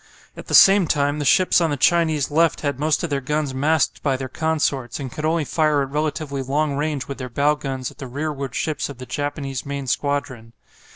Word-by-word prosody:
At - - -10
the - - +1
same 195 -2 +7
time 145 0 0
the 145 - -2
ships 180 +4 +4
on 165 - +2
the 145 - -1
Chinese 155 -2 +2
left 165 +2 +2
had 140 -3 -2
most 155 +2 +1
of 170 - -3
their 140 -1 0
guns 150 0 -2
masked 150 +4 +1
by 135 -3 0
their 130 0 -5
consorts, 145 -5 -1
and 135 -3 -5
could 155 - -5
only 160 -1 +1
fire 150 -3 +1
at 135 - -6
relatively 150 -2 -2
long 140 +2 -1
range 145 -2 -2
with 140 - -6
their 130 -1 -5
bow 145 +5 +2
guns 135 -3 -5
at - - -20
the 135 - -6
rearward 140 -1 -4
ships 155 -3 -2
of 140 - -9
the 130 - -8
Japanese 140 -2 -4
main 140 -1 -5
squadron. 130 -4 -2
145 Hz, 220 wpm, -22 LUFS, 135-155 Hz, -, same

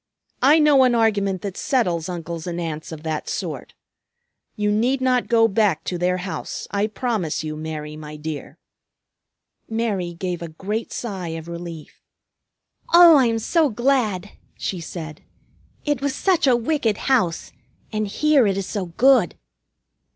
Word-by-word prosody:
I 285 +5 +6
know 300 -3 +5
an 250 -2 +3
argument 200 -4 +1
that 195 -2 -4
settles 180 - 0
uncles 170 -1 -5
and 175 0 -3
aunts 160 -2 -5
of 155 -1 -8
that 155 -1 -3
sort. - - -5 0.8
You 210 0 0
need 240 +6 +1
not 255 -1 +1
go 225 -1 +4
back 200 -6 +1
to 180 - -3
their 180 +1 +1
house, 185 +1 -5
I 200 +1 +1
promise 215 - -2
you, 155 -1 -4
Mary, 155 -1 -6
my 150 0 -9
dear." 150 -1 -6 1.1
Mary 205 -7 -2
gave 180 0 -4
a 170 - -4
great 200 +8 -4
sigh 185 -8 -4
of 160 0 -9
relief. 170 -2 -8 0.9
"Oh, 340 -1 +9
I 260 -3 +4
am 230 0 0
so 310 +7 +2
glad!" 220 -5 0 0.3
she 185 - -3
said. 160 -2 -7 0.6
"It 290 -2 0
was 280 -1 -1
such 350 -4 +2
a 255 - +5
wicked 240 -3 0
house. 185 -11 +1 0.4
And 215 0 -1
here 280 +3 +3
it 195 -1 0
is 195 - -2
so 195 -3 -3
good!" 260 +10 +3
200 Hz, 155 wpm, -22 LUFS, 170-245 Hz, 1.1 s, Oh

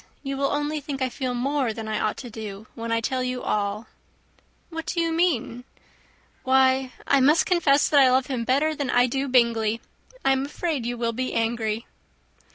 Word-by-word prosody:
You 275 -1 -3
will 275 0 +1
only 295 +1 -1
think 280 -1 -5
I 260 -1 0
feel 255 -1 -3
more 265 -1 0
than 220 0 -6
I 215 -1 -1
ought 215 - -1
to 245 - -8
do 215 -2 -7
when 230 0 -5
I 230 0 +1
tell 255 +3 -1
you 255 0 -3
all." 210 +1 -1 0.9
"What 325 0 -6
do 345 - -1
you 330 -1 +1
mean?" 300 -8 0 0.8
"Why, 260 0 +3
I 280 - +4
must 295 +5 +4
confess 315 -6 +3
that 290 - +4
I 265 -2 +7
love 260 +1 +3
him 255 -4 -3
better 280 +6 +2
than 285 -3 -3
I 245 0 +4
do 270 +3 -2
Bingley. 230 -3 +2 0.5
I 270 - +5
am 265 0 +1
afraid 290 -3 -3
you 245 0 -3
will 230 -1 -1
be 255 +2 -3
angry." 225 -1 -1
255 Hz, 195 wpm, -24 LUFS, 230-280 Hz, 0.9 s, I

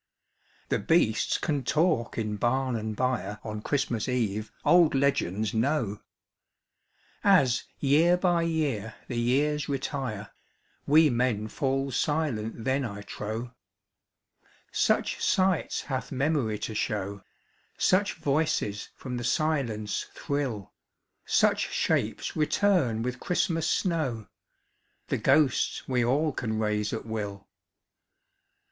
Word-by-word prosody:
The - - +1
beasts 115 -10 +2
can 145 -5 -1
talk 155 -3 +1
in 105 -2 -2
barn 130 +3 0
and 110 -1 -3
byre 120 -4 -1
On 105 -1 -5
Christmas 125 -3 -1
Eve, 110 -4 -1
old 170 -4 +5
legends 110 -7 +1
know, 115 -3 0 1.2
As 140 -12 +4
year 160 +6 +4
by 175 -2 +2
year 145 -10 -1
the 120 -2 -2
years 145 +5 +1
retire, 130 -6 -3 0.6
We 155 0 +6
men 120 -3 0
fall 135 +2 -1
silent 125 -6 -1
then 130 +3 +1
I 100 -4 -5
trow, 110 +4 -5 1.2
Such - - +1
sights 185 -3 +1
hath 130 -2 -4
Memory 135 -5 0
to 110 +1 -5
show, 100 -2 -2 0.6
Such 195 +2 +2
voices 140 -8 -1
from 125 -2 -5
the 120 - -4
silence 120 -8 -1
thrill, 130 -9 -3 0.5
Such - - +2
shapes - - -1
return 155 - +2
with 125 +1 -3
Christmas 165 -2 0
snow, 150 - 0
ŌĆö - - -44
The - - +1
ghosts 145 -5 +2
we 125 -2 +1
all 145 +6 +2
can 110 -5 -3
raise 105 -1 0
at 115 - -4
will. 105 -3 -5
125 Hz, 115 wpm, -28 LUFS, 110-150 Hz, 1.2 s, We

